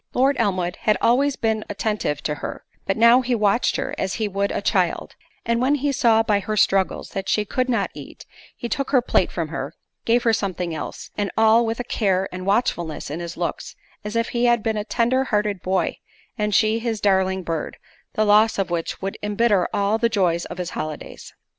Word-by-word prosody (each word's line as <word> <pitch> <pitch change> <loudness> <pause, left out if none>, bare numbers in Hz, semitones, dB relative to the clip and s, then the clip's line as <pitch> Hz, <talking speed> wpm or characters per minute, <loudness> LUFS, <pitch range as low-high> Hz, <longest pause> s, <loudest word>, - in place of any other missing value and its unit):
Lord 270 +2 +3
Elmwood 185 -4 0
had 215 -3 +1
always 270 +4 +3
been 220 -1 -1
attentive 205 -8 -2
to 150 - -1
her; - - -6 0.2
but 195 - 0
now 235 +3 +6
he 250 -1 0
watched 215 +2 +2
her - - -3
as 190 - -1
he 220 - -1
would 200 0 -1
a - - -1
child; - - 0 0.3
and 235 0 +1
when 270 +3 +3
he 285 0 0
saw 225 -4 +3
by 210 -2 +2
her 215 +2 -3
struggles 195 -1 +1
that 195 -1 -4
she 210 - +1
could 255 +5 -1
not 235 - 0
eat, - - -11 0.3
he 240 - -4
took 275 +2 -2
her 260 -3 +4
plate - - +2
from - - -3
her; - - -5 0.3
gave 235 +1 +3
her 230 - +3
something 185 -5 -2
else; 155 - -7
and 205 -1 0
all 225 +1 +5
with 225 +1 -2
a - - -1
care 195 -5 0
and 185 +1 -6
watchfulness 175 - -1
in 155 - -4
his 170 -1 -6
looks, 175 - -4 0.3
as 210 +2 -5
if 230 0 0
he 240 0 0
had 240 -2 +3
been 220 -1 0
a 210 - -2
tender 245 +4 +1
hearted 210 -5 -1
boy, 185 -2 0 0.4
and 210 -3 -1
she 220 +1 +3
his 225 -2 -2
darling 190 -2 +1
bird, 165 -2 -4 0.4
the 215 - +1
loss 215 +2 +4
of 195 -3 -1
which 170 +2 -3
would 195 - -4
embitter 210 -2 +2
all 205 +2 +1
the 235 0 +2
joy 185 -6 +2
of - - -7
his 180 -2 -4
holidays. 155 -1 -6
210 Hz, 210 wpm, -22 LUFS, 190-235 Hz, 0.4 s, now